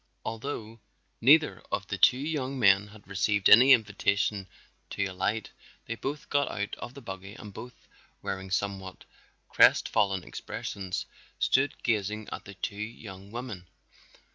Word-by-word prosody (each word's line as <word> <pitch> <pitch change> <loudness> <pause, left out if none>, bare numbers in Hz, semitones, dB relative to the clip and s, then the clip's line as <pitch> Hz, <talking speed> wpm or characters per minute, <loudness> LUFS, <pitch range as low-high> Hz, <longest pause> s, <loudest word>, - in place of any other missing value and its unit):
Although 115 -1 -5 0.4
neither 150 +5 +5
of - - -1
the - - -4
two 125 - +6
young 140 -2 -3
men 100 -3 +5
had 105 -1 -16
received 100 +1 +1
any 125 +5 +9
invitation 100 -3 +2 0.4
to 100 - -1
alight, 95 +3 -2 0.3
they 115 - -3
both 140 +5 -5
got 145 0 +2
out 100 0 -4
of 120 +2 -8
the 140 - -11
buggy 95 0 -8
and 105 -3 -10
both 120 +4 -11 0.4
wearing 95 0 -4
somewhat 95 0 -3 0.4
crestfallen 95 -3 +4
expressions, 95 0 -5 0.3
stood 135 +2 +2
gazing 105 -1 -1
at - - -6
the 100 - -10
two 100 - -4
young 105 -3 -8
women. 110 -6 -7
105 Hz, 140 wpm, -28 LUFS, 95-120 Hz, 0.4 s, any